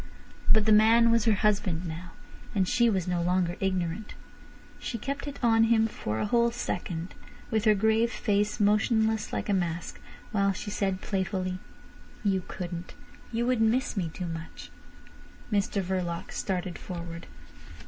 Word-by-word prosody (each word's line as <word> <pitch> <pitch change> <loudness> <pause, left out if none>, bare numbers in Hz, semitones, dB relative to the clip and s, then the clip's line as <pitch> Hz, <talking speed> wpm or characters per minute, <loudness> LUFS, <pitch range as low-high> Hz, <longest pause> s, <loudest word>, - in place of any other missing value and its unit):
But 215 -1 +5
the 220 - +4
man 225 +2 +6
was 230 -2 +3
her 220 -2 +4
husband 195 -4 +1
now, 170 +2 -7 0.4
and 190 -2 +2
she 235 +3 +3
was 190 -4 0
no 175 -1 0
longer 175 0 +1
ignorant. 185 +1 -2 0.6
She 235 - -4
kept 280 +5 -4
it 280 - -5
on 225 -1 +5
him 225 -1 +4
for 110 - -3
a - - 0
whole 235 +2 +3
second, 180 -7 -4 0.4
with 220 -1 +1
her 215 -1 +6
grave 220 +3 +2
face 210 -2 0
motionless 220 +1 +2
like - - -3
a 205 - +1
mask, 175 -3 -2 0.3
while 200 -3 +2
she 205 +1 -6
said 195 -2 -1
playfully: 185 -2 -2 0.6
"You 195 -2 +2
couldn't. 175 -1 -6 0.4
You 235 +1 0
would 250 -2 +1
miss 230 +4 +2
me 180 -5 -1
too 180 - -5
much." 165 -1 -7 0.8
Mr 200 -1 +1
Verloc 180 -2 -3
started 185 -2 -3
forward. 170 -2 -7
200 Hz, 155 wpm, -28 LUFS, 180-220 Hz, 0.8 s, man